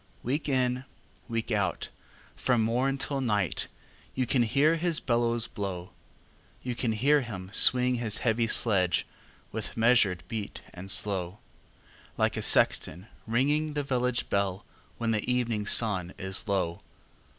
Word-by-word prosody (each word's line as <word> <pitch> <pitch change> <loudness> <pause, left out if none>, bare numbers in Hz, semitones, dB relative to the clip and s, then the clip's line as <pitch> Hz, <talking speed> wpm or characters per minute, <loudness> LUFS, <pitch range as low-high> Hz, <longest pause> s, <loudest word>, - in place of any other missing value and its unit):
Week 145 +5 -2
in, 125 -1 0 0.5
week 115 0 -3
out, 105 -3 -2 0.5
from 120 -3 +1
morn 125 +5 0
till 135 0 -2
night, 105 -8 -1 0.5
You 130 - 0
can 125 +1 +1
hear 140 +8 +2
his 170 -1 +1
bellows 120 -1 0
blow; 95 -6 -6 0.7
You 125 - -3
can 120 -1 -2
hear 140 +7 +2
him 95 -6 -8
swing 125 +1 +8
his 110 -3 -2
heavy 115 -1 0
sledge, 95 -6 +2 0.5
With - - -6
measured 115 -7 +3
beat 110 -3 -6
and 95 +2 -10
slow, 95 -1 0 0.8
Like - - 0
a - - -3
sexton 90 +7 +2 0.2
ringing 145 +6 0
the 145 - -1
village 125 -2 -1
bell, 100 +1 -2 0.3
When 115 -1 -1
the 110 +3 -1
evening 115 -4 -1
sun 95 -6 +2
is 95 +3 -4
low. 95 -2 -2
115 Hz, 140 wpm, -27 LUFS, 100-125 Hz, 0.8 s, swing